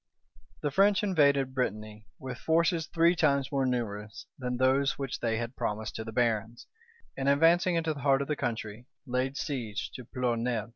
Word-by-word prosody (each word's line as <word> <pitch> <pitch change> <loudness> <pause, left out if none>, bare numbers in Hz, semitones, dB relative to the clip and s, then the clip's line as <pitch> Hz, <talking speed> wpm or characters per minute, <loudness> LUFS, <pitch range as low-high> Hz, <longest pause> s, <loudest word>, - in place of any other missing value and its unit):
The 145 - 0
French 200 +6 +4
invaded 140 -8 +3
Brittany 110 -4 -3
with 130 -2 -7
forces 165 0 +1
three 170 +1 +3
times 140 -4 +2
more 135 -2 +1
numerous 110 -3 -3
than 125 -1 -2
those 135 +2 +2
which 135 -2 -4
they 115 -1 0
had 120 +2 -4
promised 105 +1 -3
to 110 - -4
the 110 - -7
barons; 115 -1 -1 0.5
and 135 0 0
advancing 170 +5 +4
into 165 -1 0
the 145 - -9
heart 140 -1 +3
of - - -9
the 150 - 0
country, 115 -2 -4 0.2
laid 130 +1 -1
siege 120 -7 -4
to 125 - -9
Ploerrnel. 120 -2 -2
130 Hz, 175 wpm, -29 LUFS, 115-145 Hz, 0.5 s, French